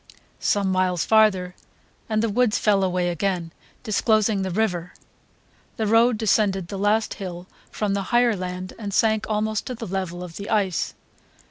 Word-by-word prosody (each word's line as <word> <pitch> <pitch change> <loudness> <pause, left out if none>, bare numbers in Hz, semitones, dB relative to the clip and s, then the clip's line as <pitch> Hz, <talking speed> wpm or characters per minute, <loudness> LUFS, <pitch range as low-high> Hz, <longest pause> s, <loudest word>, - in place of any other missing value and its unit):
Some 200 -2 +1
miles 185 -2 +1
farther, 205 -5 +3 0.6
and 215 0 +1
the 230 - +1
woods 230 +1 +2
fell 200 -2 +2
away 180 -1 0
again, 175 -1 -2 0.3
disclosing 215 -2 +2
the 190 - -2
river. 180 -3 -1 0.8
The 220 - 0
road 225 +2 +4
descended 195 -4 +1
the 195 - -5
last 210 +2 +1
hill 180 -2 -6 0.2
from 210 -2 -2
the 200 - 0
higher 240 -1 +3
land 185 0 -5
and 200 -3 -4
sank 220 -1 +2
almost 215 0 -1
to 255 - -4
the 230 - -6
level 185 -2 -4
of 170 -2 -9
the 200 - -6
ice. 195 -6 0
200 Hz, 160 wpm, -23 LUFS, 185-220 Hz, 0.8 s, road